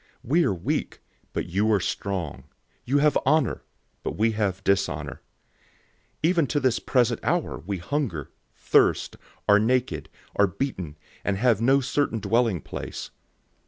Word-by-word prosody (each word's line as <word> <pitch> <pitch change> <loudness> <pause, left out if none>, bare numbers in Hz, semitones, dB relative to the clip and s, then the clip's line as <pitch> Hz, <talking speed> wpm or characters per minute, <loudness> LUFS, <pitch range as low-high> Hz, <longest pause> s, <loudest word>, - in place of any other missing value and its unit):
We 165 +8 +3
are - - +2
weak, 85 - -2 0.3
but - - -2
you 100 +5 +1
are 105 - +4
strong. 95 -4 -3 0.4
You 135 +4 +2
have 150 0 +4
honor, 150 -1 +2 0.4
but - - -4
we 115 +1 +3
have 105 -4 -1
dishonor. 75 -8 0 1.0
004:011 160 - +5
Even 170 -5 +2
to 145 - +1
this 130 -4 +2
present 120 -3 +2
hour 170 +1 0
we 100 +2 -4
hunger, 90 - -3 0.2
thirst, - - +2 0.3
are 105 0 +7
naked, 125 +3 0 0.3
are 100 - +4
beaten, 90 - -4 0.3
and 100 -1 0
have 115 -1 +3
no 135 +4 +4
certain 135 -2 0
dwelling 110 -2 +1
place. - - -6
110 Hz, 145 wpm, -25 LUFS, 95-135 Hz, 1.0 s, are